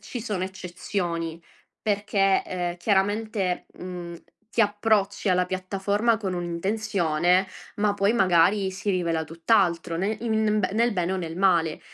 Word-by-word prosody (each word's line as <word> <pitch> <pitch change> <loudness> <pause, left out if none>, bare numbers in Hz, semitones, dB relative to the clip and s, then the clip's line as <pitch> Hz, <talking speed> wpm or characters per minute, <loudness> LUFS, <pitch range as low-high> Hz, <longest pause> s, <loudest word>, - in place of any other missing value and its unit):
ci 245 - -6
sono 205 -5 -2
eccezioni 175 -2 -4 0.4
perché, 200 -2 +1
eh, 175 -1 -3
chiaramente, 205 -1 0
mhmm, 175 -1 -7 0.4
ti 230 - +3
approcci 205 -1 +1
alla 180 0 +3
piattaforma 200 +4 0
con 195 -4 -3
un'intenzione, 180 -1 +1 0.3
ma 205 0 +1
poi 200 +2 +2
magari 190 -1 +3
si 200 +2 -2
rivela 170 -3 0
tutt'altro 170 0 +1
nel 200 +5 -1
in 230 - -1
in 215 -1 +2
b - - 0
nel 235 +1 +2
bene 180 -1 -1
o - - 0
nel 165 -2 -5
male. 170 -5 +2
190 Hz, 140 wpm, -25 LUFS, 175-210 Hz, 0.4 s, ti